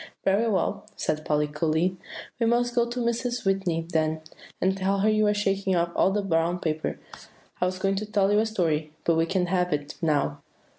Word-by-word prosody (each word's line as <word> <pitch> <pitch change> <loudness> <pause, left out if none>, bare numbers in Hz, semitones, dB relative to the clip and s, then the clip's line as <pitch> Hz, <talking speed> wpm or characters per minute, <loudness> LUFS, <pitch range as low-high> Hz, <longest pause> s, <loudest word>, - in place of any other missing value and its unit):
"Very 200 +4 +3
well," 200 +1 -1
said 155 0 -2
Polly 150 -1 +1
coolly; 160 +4 0 0.4
"we 230 - +2
must 240 +1 +2
go 235 -1 +2
to 245 +1 -4
Mrs. 240 0 -1
Whitney 190 -4 0
then, 160 -2 0 0.4
and 190 +1 +2
tell 195 +1 0
her 210 - +3
that - - +3
you 215 0 +3
are 210 - +3
shaking 195 -2 0
off 170 0 +1
all - - +4
the 205 +1 0
brown 170 -1 +1
paper. 155 -3 -2 0.6
I 180 - +3
was 185 0 -3
going 195 +1 0
to 210 - -2
tell 205 -2 +2
you 210 - +4
a 220 - +2
story, 160 -7 -1
but 170 - +3
we 165 0 +2
can't 180 0 0
have 180 -1 +1
it 145 -1 -3
now." 145 -2 0
185 Hz, 210 wpm, -26 LUFS, 165-210 Hz, 0.6 s, all